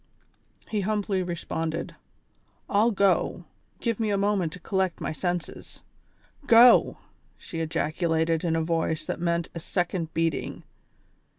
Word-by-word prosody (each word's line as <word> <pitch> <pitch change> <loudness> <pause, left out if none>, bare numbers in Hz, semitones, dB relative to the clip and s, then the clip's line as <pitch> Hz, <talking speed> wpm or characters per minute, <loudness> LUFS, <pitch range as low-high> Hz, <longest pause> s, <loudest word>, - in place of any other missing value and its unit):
" - - -32
He 210 -2 0
humbly 205 -1 0
responded: 165 -2 -3 0.7
"I'll 215 +3 +3
go, 200 -3 +1 0.4
give 230 -2 -1
me 220 -2 0
a 200 - +1
moment 200 -4 +1
to 180 - -9
collect 190 -1 -1
my - - -3
senses." 175 +1 -4 0.7
"Go," 235 +2 +7 0.4
she 165 - -7
ejaculated 160 +1 0
in 165 -2 +1
a 165 - +1
voice 160 -1 -1
that - - -4
meant 170 -1 -1
a 170 - -5
second 175 -1 -2
beating. 165 -2 -1
175 Hz, 130 wpm, -26 LUFS, 165-200 Hz, 0.7 s, Go